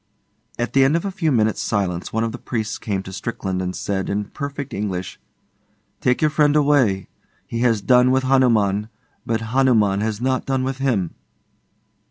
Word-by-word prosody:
At 120 - -2
the 135 - +5
end 135 +4 +3
of 170 - -1
a 200 - -2
few 165 -4 0
minutes' 110 -4 +1
silence 95 -5 -2
one 115 +1 0
of 115 - -1
the 120 - -7
priests 110 -3 -3
came 100 -3 -3
to 95 - -9
Strickland 95 -3 -3
and 90 0 -3
said, 95 -1 -2
in 105 +1 -1
perfect 140 +3 -6
English, 95 -3 -4 0.8
'Take 125 -1 +1
your 155 - +3
friend 150 -1 +3
away. 140 -10 +3 0.4
He 115 - -4
has 115 -4 +2
done 125 0 +5
with 130 0 +2
Hanuman, 110 -6 +2 0.4
but 115 0 0
Hanurnan 110 -7 +3
has 110 -1 -2
not 130 +1 -1
done 135 -1 0
with 130 0 -3
him. 115 -11 0
115 Hz, 180 wpm, -21 LUFS, 100-135 Hz, 0.8 s, the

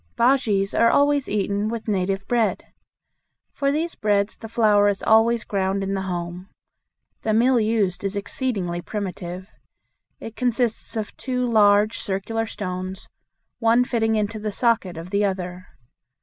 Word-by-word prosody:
Bujeas 225 -6 +2
are 230 - +4
always 285 0 +2
eaten 205 0 0
with 230 -1 -5
native 195 -1 -1
bread. 235 -3 0 0.9
For 275 0 0
these 325 +3 -1
breads 205 -1 0
the 225 - -10
flour 215 -3 +4
is 200 - -2
always 225 +1 +4
ground 195 0 -1
in 195 0 -2
the 195 - -1
home. 180 0 -5 0.7
The 215 -1 0
mill 245 +2 +4
used 215 -5 0
is 195 0 -2
exceedingly 200 -5 -2
primitive. 185 -1 -6 0.7
It 225 - -8
consists 245 -2 -1
of 215 -1 -4
two 250 -1 -2
large 215 -1 +4
circular 225 +3 -2
stones, 185 -2 -5 0.5
one 230 +1 +4
fitting 225 -3 0
into 215 +1 -1
the 210 0 -3
socket 205 -6 0
of 170 +3 -8
the 200 0 +1
other. 185 -2 -3
210 Hz, 145 wpm, -23 LUFS, 195-230 Hz, 0.9 s, are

